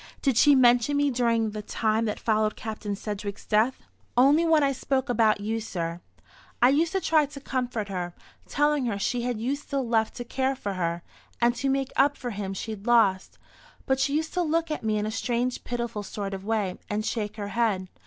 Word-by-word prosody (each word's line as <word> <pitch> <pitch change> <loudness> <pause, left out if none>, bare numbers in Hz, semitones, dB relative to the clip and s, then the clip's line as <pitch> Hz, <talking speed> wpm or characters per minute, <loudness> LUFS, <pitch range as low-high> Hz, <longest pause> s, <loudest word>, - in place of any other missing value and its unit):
"Did 270 -4 +2
she 285 +4 +6
mention 245 +2 +4
me 285 -1 +2
during 230 -3 +1
the 210 0 -5
time 220 +1 0
that 210 - -2
followed 215 -1 +1
Captain 215 -2 -5
Sedgewick's 205 0 -6
death?" 220 +5 +1 0.3
"Only 280 +6 +5
when 315 -2 +4
I 275 - +3
spoke 265 0 -1
about 220 -3 +3
you, 220 +2 -1
sir. 170 -5 -4 0.6
I 245 - +6
used 320 +6 +2
to 385 - +2
try 315 -5 +3
to 285 0 -10
comfort 250 -6 -3
her, 180 -2 -4 0.3
telling 295 -3 +1
her 210 -4 -1
she 240 +4 -1
had 240 -2 -2
you 255 +5 0
still 280 -3 -3
left 225 -1 +1
to 245 - -5
care 265 +2 -1
for 205 -6 -4
her, 170 -2 -2 0.4
and 240 0 +3
to 270 +3 0
make 270 0 0
up 285 +1 +3
for 245 -2 -5
him 195 -2 -4
she'd 215 +1 -6
lost. 205 -6 +3 0.5
But 265 0 +1
she 280 +1 +1
used 315 +1 -1
to 360 - +1
look 330 0 0
at 305 - -2
me 215 -1 +1
in 210 - -1
a 215 - -2
strange 245 +2 -1
pitiful 235 -3 -3
sort 200 -1 -5
of 190 0 -6
way, 205 -4 -1
and 210 +1 -2
shake 210 -3 -2
her 205 -2 -5
head. 205 -4 0
235 Hz, 210 wpm, -26 LUFS, 210-270 Hz, 0.6 s, she